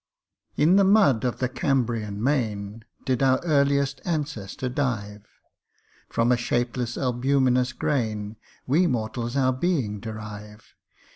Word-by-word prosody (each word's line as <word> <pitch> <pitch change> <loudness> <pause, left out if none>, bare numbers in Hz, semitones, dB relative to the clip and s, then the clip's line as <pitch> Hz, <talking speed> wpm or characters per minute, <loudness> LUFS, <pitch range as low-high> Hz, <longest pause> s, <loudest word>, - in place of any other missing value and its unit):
IN 165 +6 +4
the 200 - +5
mud 195 - +4
of 125 -2 -1
the 130 - 0
Cambrian 115 -6 -1
main 110 -6 -1 0.2
Did 130 -1 0
our 130 -1 +4
earliest 140 -2 +2
ancestor 145 - -3
dive: 115 -6 -3 0.8
From 115 +2 +1
a 125 - +4
shapeless 120 0 -2
albuminous 130 0 +1
grain 110 -6 -2 0.3
We 165 +8 +3
mortals 120 0 -2
our 130 -1 +3
being 130 - -1
derive. 105 -1 -9
125 Hz, 120 wpm, -25 LUFS, 110-140 Hz, 0.8 s, the